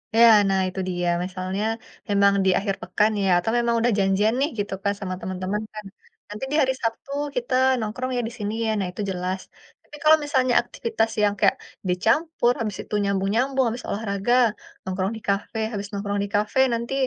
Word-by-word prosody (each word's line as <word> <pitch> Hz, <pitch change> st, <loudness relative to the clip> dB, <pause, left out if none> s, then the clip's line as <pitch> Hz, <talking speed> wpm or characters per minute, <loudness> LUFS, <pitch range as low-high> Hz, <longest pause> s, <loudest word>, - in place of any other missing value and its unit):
Iya, 235 Hz, 0 st, +8 dB, 0.2 s
nah 195 Hz, 0 st, +2 dB
itu 185 Hz, +1 st, -5 dB
dia 175 Hz, -1 st, -2 dB, 0.2 s
misalnya 185 Hz, +2 st, -3 dB, 0.5 s
memang 200 Hz, 0 st, +4 dB
di -, -, +4 dB
akhir 195 Hz, -1 st, -2 dB
pekan 210 Hz, +4 st, +1 dB
ya 195 Hz, -, +2 dB
atau 225 Hz, +5 st, -1 dB
memang 235 Hz, -1 st, +1 dB
udah 240 Hz, +1 st, +2 dB
janjian 195 Hz, +3 st, +2 dB
nih 285 Hz, -, +2 dB
gitu 205 Hz, -1 st, -2 dB
kan 200 Hz, -, +1 dB
sama 185 Hz, -2 st, -4 dB
temen-temen 185 Hz, +3 st, -3 dB
kan, 215 Hz, -1 st, -8 dB, 0.2 s
nah -, -, -26 dB, 0.2 s
nanti 210 Hz, +5 st, -5 dB
di -, -, 0 dB
hari 265 Hz, -1 st, +2 dB
Sabtu 230 Hz, +4 st, -3 dB, 0.2 s
kita 250 Hz, +1 st, -2 dB, 0.3 s
nongkrong 235 Hz, +4 st, -3 dB
ya -, -, +1 dB
di 230 Hz, -, -8 dB
sini 210 Hz, 0 st, -3 dB
ya, -, -, 0 dB
nah 190 Hz, -, -1 dB
itu 185 Hz, -, -6 dB
jelas. 185 Hz, +1 st, -2 dB, 0.4 s
Tapi 295 Hz, -, -13 dB
kalau 310 Hz, +1 st, +7 dB
misalnya 260 Hz, -3 st, +2 dB
aktivitas 230 Hz, -1 st, -2 dB
yang 205 Hz, -, +3 dB
kayak -, -, +4 dB, 0.3 s
dicampur 240 Hz, -, +2 dB
habis 210 Hz, -4 st, -3 dB
itu -, -, -13 dB
nyambung-nyambung, 225 Hz, +7 st, +1 dB
habis 240 Hz, +2 st, -6 dB
olahraga 200 Hz, +1 st, -1 dB, 0.5 s
nongkrong 190 Hz, +1 st, -2 dB
di -, -, -11 dB
kafe, 200 Hz, +3 st, -1 dB
habis 200 Hz, -1 st, -4 dB
nongkrong 200 Hz, 0 st, -2 dB
di -, -, -9 dB
kafe 210 Hz, +6 st, +1 dB
nanti 235 Hz, +3 st, -3 dB
210 Hz, 190 wpm, -24 LUFS, 195-235 Hz, 0.5 s, Iya